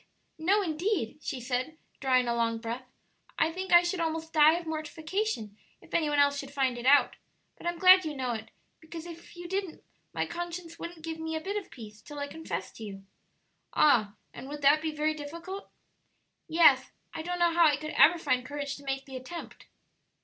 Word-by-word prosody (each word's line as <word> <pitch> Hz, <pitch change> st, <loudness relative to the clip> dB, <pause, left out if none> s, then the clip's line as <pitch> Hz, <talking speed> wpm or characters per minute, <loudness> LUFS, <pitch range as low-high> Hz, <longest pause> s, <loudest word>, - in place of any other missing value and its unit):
No 395 Hz, +6 st, +3 dB
indeed!" 325 Hz, -, -1 dB
she 265 Hz, -, -4 dB
said, 255 Hz, +5 st, -3 dB, 0.2 s
drawing 255 Hz, -2 st, +2 dB
a 235 Hz, -, +1 dB
long 230 Hz, -1 st, 0 dB
breath; 235 Hz, +3 st, -5 dB, 0.5 s
"I 320 Hz, -, +2 dB
think 375 Hz, +2 st, -5 dB
I 345 Hz, 0 st, +8 dB
should 345 Hz, +1 st, -1 dB
almost 320 Hz, 0 st, -2 dB
die 310 Hz, +1 st, +7 dB
of 345 Hz, -, -7 dB
mortification 315 Hz, -, -3 dB, 0.2 s
if -, -, -19 dB
any 310 Hz, -3 st, +2 dB
one 295 Hz, -, 0 dB
else 285 Hz, 0 st, +4 dB
should 275 Hz, -, -7 dB
find 270 Hz, -3 st, 0 dB
it 240 Hz, -, -3 dB
out; 285 Hz, +1 st, +5 dB, 0.4 s
but -, -, -8 dB
I'm 345 Hz, 0 st, -1 dB
glad 370 Hz, +1 st, +8 dB
you 305 Hz, -2 st, -4 dB
know 255 Hz, -2 st, -2 dB
it, 220 Hz, -1 st, -6 dB, 0.3 s
because 320 Hz, +1 st, -9 dB
if 340 Hz, 0 st, -11 dB
you 350 Hz, 0 st, -7 dB
didn't 385 Hz, -2 st, -4 dB, 0.3 s
my -, -, -1 dB
conscience 345 Hz, -1 st, -6 dB
wouldn't 340 Hz, -1 st, -8 dB
give 325 Hz, 0 st, -5 dB
me 320 Hz, 0 st, -3 dB
a -, -, -1 dB
bit 390 Hz, +5 st, -4 dB
of 415 Hz, -3 st, -4 dB
peace 215 Hz, -3 st, -11 dB
till 295 Hz, +6 st, -10 dB
I 285 Hz, 0 st, -3 dB
confessed 320 Hz, +2 st, -6 dB
to 225 Hz, -, -8 dB
you." 195 Hz, -2 st, -8 dB, 0.7 s
"Ah! 215 Hz, -9 st, +4 dB, 0.2 s
and 265 Hz, -, -9 dB
would 295 Hz, 0 st, -7 dB
that 290 Hz, +2 st, +6 dB
be 320 Hz, 0 st, -2 dB
very 305 Hz, +1 st, 0 dB
difficult?" 335 Hz, +7 st, -7 dB, 0.8 s
"Yes; 330 Hz, 0 st, +5 dB, 0.2 s
I 325 Hz, -, -4 dB
don't 355 Hz, +2 st, -3 dB
know 345 Hz, -1 st, +3 dB
how 340 Hz, 0 st, +5 dB
I 290 Hz, -2 st, +3 dB
could 305 Hz, +1 st, -6 dB
ever 345 Hz, +2 st, +6 dB
find 255 Hz, -6 st, 0 dB
courage 285 Hz, +1 st, -5 dB
to 285 Hz, -, -14 dB
make 270 Hz, 0 st, -3 dB
the 265 Hz, -1 st, -7 dB
attempt." 335 Hz, +7 st, -9 dB
310 Hz, 205 wpm, -29 LUFS, 270-340 Hz, 0.8 s, I